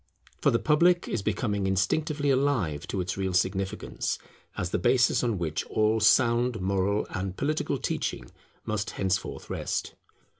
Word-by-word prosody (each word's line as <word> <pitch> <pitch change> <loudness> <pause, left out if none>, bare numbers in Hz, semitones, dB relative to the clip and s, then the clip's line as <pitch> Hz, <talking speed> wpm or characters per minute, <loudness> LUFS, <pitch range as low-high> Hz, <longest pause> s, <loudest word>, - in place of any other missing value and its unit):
For - - +4
the 115 - +3
public 170 +6 +3
is 115 - -2
becoming 100 -1 -1
instinctively 145 - +1
alive 120 - 0
to 95 - -2
its 90 +2 -3
real 95 -1 -1
significance, 95 +1 -1 0.4
as 90 -1 -2
the - - 0
basis 125 +8 +3
on 115 -4 0
which 80 -3 -2
all 110 +1 +1
sound 120 +1 +3
moral 100 +2 0
and 95 0 -4
political 150 +2 -1
teaching - - -3 0.3
must 105 0 -2
henceforth 95 -1 -2
rest. - - -2
105 Hz, 145 wpm, -27 LUFS, 95-125 Hz, 0.4 s, For